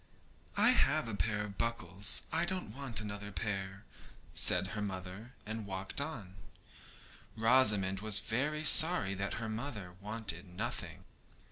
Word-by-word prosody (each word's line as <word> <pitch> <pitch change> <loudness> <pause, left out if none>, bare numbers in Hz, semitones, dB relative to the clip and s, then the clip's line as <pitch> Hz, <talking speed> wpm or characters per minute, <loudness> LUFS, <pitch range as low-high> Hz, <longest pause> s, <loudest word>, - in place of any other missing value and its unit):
'I - - +5
have - - +2
a 115 - -3
pair 105 0 -1
of 100 -1 -9
buckles; 105 -4 -1
I 165 +2 0
don't 180 - -4
want 130 -6 -3
another 100 -1 -6
pair,' 95 +1 -5 0.5
said 90 +2 +3
her 105 - -4
mother, 95 +4 -7
and 110 -1 -6
walked 95 +6 -4
on. 110 -11 -7 1.0
Rosamond 110 -5 +3
was 105 0 +3
very 150 +9 -2
sorry 155 - +8
that 100 +1 -4
her 115 -1 -5
mother 110 -5 -6
wanted 105 -4 -4
nothing. 90 0 -6
105 Hz, 135 wpm, -33 LUFS, 95-115 Hz, 1.0 s, sorry